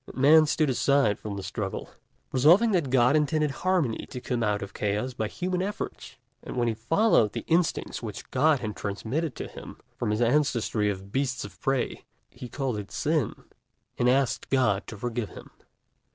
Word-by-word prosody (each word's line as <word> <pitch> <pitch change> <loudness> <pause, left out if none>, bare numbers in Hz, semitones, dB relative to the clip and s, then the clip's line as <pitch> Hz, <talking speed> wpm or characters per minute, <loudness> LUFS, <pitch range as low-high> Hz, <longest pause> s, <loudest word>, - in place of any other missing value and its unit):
And - - -11
Man 155 +4 +7
stood 150 -1 +2
aside 135 -5 +2
from 105 -2 -5
the 100 - -5
struggle, - - -4 0.4
resolving 175 - +5
that 170 -9 +1
God 125 +2 +4
intended 150 0 +2
harmony 160 -4 0
to 125 - -6
come 125 -1 -2
out 105 -2 0
of 100 0 -9
chaos 105 +5 -1
by 110 -2 -2
human 180 - -2
efforts. 200 -8 -5 0.3
And - - -7
when 120 -1 +2
he 115 - +1
followed 115 - +2
the - - -5
instincts 165 0 0
which 110 -4 -7
God 145 +1 +3
had 110 -3 -4
transmitted 120 +9 -3
to - - -5
him - - -10 0.2
from - - -2
his 105 +1 0
ancestry 120 -5 +1
of 95 0 -5
beasts 135 0 -1
of - - -13
prey, 135 -2 -1 0.3
he 125 - -9
called 130 -5 -2
it 100 - -8
Sin, 155 -6 -1 0.5
and 125 - +2
asked 135 0 +1
God 115 -7 +2
to 110 - -8
forgive 120 -1 -3
him. - - -12
125 Hz, 180 wpm, -27 LUFS, 110-150 Hz, 0.5 s, Man